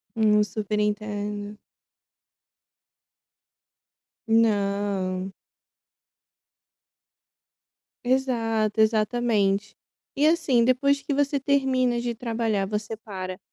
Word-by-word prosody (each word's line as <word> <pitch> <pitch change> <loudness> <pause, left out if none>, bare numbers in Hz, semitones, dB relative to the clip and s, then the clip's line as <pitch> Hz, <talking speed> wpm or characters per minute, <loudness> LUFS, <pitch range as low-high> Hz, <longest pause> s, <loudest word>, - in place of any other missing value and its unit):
Hum, 210 -1 +4
super 210 +1 -3
entendo. 210 0 -3 2.7
Não. 200 -4 +1 2.7
Exato, 225 -5 +1
exatamente. 215 -2 +1 0.4
E, 295 +2 +3
assim, 265 -8 +3
depois 280 +2 +2
que 285 - -3
você 285 0 +1
termina 260 -3 +1
de 240 -1 -2
trabalhar, 225 -4 -1
você 215 +1 -4
para, 185 -4 -7
220 Hz, 70 wpm, -25 LUFS, 205-245 Hz, 2.7 s, Hum